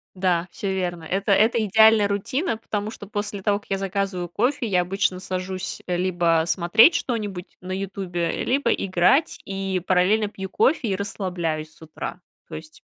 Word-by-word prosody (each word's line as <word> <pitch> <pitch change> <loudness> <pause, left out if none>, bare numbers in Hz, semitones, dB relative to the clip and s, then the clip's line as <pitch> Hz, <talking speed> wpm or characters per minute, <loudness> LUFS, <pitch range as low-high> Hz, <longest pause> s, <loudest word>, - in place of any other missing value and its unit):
Да, 180 -1 +1
всё 195 -2 -3
верно. 175 -3 -3
Это 195 +4 -1
это 220 +3 +4
идеальная 220 0 +5
рутина, 225 - -1
потому 215 -1 -4
что 205 - -10
после 205 -1 -4
того, 205 +1 +1
как - - -25
я 195 - 0
заказываю 195 -2 -2
кофе, 240 - 0
я 180 -3 +2
обычно 185 0 -1
сажусь 185 0 -4
либо 175 -2 +1
смотреть 180 - +5
что-нибудь 205 -7 -3
на 185 +1 -7
"Ютубе", 185 -3 -3
либо 260 -2 +1
играть 190 - +2
и 195 -2 -2
параллельно 195 +4 +3
пью 190 -2 -7
кофе 255 0 +2
и 190 - +1
расслабляюсь 175 -6 -3
с - - -24
утра. 160 -1 -7 0.3
То - - -7
есть 315 +2 -11
195 Hz, 160 wpm, -23 LUFS, 180-210 Hz, 0.3 s, идеальная